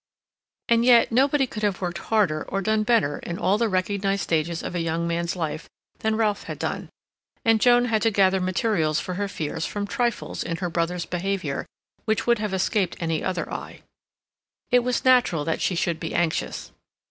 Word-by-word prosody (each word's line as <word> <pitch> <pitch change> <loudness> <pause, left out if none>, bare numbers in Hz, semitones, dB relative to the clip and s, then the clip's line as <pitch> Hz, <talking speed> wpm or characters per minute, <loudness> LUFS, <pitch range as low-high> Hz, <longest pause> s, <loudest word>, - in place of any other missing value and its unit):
And 235 0 +4
yet 240 -1 +5
nobody 270 +3 +3
could 215 -4 -7
have 205 -3 0
worked 175 -1 -3
harder 190 -8 +1
or 195 +1 -2
done 215 +2 +2
better 215 -10 +2
in 170 - -5
all 200 +1 +1
the 230 -1 +2
recognized 195 +1 0
stages 165 +1 -1
of - - -5
a 175 - -1
young 165 +1 -1
man's 170 +1 -1
life 160 -2 -4 0.3
than 220 0 0
Ralph 215 -2 0
had - - -6
done, - - -4 0.6
and 225 -1 +4
Joan 245 0 +5
had 220 -3 +1
to 225 - +3
gather 190 -2 +3
materials 180 -4 +1
for 180 - -4
her 200 +2 -2
fears 160 -4 -3
from 205 0 -3
trifles 235 +3 -2
in 165 - -3
her 175 -1 -3
brother's 170 +1 -1
behavior 180 -5 -3 0.4
which 220 -1 0
would 235 -2 +3
have 210 -2 -2
escaped 190 0 0
any 165 -2 -1
other 180 -3 -2
eye. - - -7 0.9
It 245 - +6
was 245 +1 -1
natural 245 - +4
that 165 - -1
she 185 - +1
should 170 -2 -1
be 165 - -4
anxious. 170 -2 -1
190 Hz, 190 wpm, -24 LUFS, 170-220 Hz, 0.9 s, It